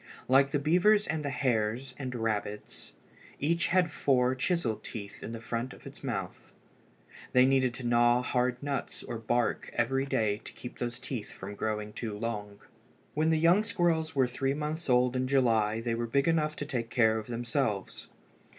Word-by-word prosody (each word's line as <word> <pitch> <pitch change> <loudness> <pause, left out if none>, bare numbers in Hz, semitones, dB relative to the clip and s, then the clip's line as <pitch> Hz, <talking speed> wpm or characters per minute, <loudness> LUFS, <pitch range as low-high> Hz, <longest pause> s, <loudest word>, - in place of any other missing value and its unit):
Like 135 +2 +5
the 145 - +1
beavers 180 +8 +4
and 150 0 -2
the 145 - -1
hares 125 -1 0
and 130 -1 -5
rabbits 105 -2 -3 0.5
each 170 +4 +1
had 180 -2 +2
four 130 -4 +2
chisel 130 - 0
teeth 100 -2 -8
in - - -6
the 115 - -5
front 115 +2 -3
of - - -16
its - - -11
mouth. - - -5 0.8
They 125 0 +7
needed 130 -2 +2
to 130 - -7
gnaw 120 +1 +4
hard 125 +1 0
nuts 140 -1 -3
or 115 - -5
bark 120 +1 0
every 135 +3 +1
day 105 -5 0
to - - -8
keep 125 - -9
these 120 -1 -3
teeth 125 -3 -5
from 100 +2 -8
growing 105 0 -3
too 110 -3 -4
long. 105 -2 -4 0.5
When 155 +2 +2
the 160 - +3
young 170 +6 +5
squirrels 170 -8 0
were 135 -2 +4
three 135 +2 -1
months 150 +1 -3
old 125 0 +3
in 130 0 0
July 115 -5 +2
they 115 0 -1
were 115 0 -2
big 140 +5 +1
enough 155 -2 +2
to 145 - -4
take 125 -6 -3
care 110 -3 +3
of 110 - -9
themselves. 120 -3 -2
125 Hz, 180 wpm, -30 LUFS, 115-145 Hz, 0.8 s, They